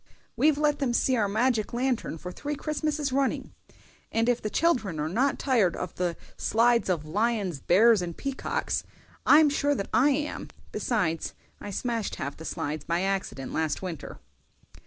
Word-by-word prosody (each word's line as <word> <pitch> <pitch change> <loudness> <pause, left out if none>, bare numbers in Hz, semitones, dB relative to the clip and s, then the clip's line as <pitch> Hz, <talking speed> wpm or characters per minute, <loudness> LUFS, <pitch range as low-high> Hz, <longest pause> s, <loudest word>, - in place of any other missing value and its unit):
"We've 285 +5 +3
let 295 -1 +2
them 265 -4 0
see 260 - +3
our 215 -4 +2
magic 220 +1 +1
lantern 245 -8 -1
for 180 +3 -7
three 295 +10 -4
Christmases 305 -1 -2
running, 270 0 0 0.6
and 225 +1 +1
if 245 -1 +2
the 215 - -2
children 220 - +1
are 150 - -1
not 255 - +1
tired 225 -11 +2
of 180 - -5
the 175 -2 -2 0.2
slides 235 0 +3
of 165 -5 0
lions, 200 -2 0
bears, 210 - +5
and 170 -2 -5
peacocks, 275 -1 -2 0.4
I'm 305 +1 +8
sure 285 0 +1
that 200 - -4
I 275 +4 +5
am; 295 +2 -2 0.2
besides, 170 -9 -1 0.2
I 205 - -7
smashed 230 +1 -2
half 140 +1 -4
the 160 - -10
slides 150 0 -3
by 170 +1 0
accident 185 -10 -2
last 160 +2 -1
winter. 175 -5 -6
225 Hz, 165 wpm, -27 LUFS, 180-270 Hz, 0.6 s, I'm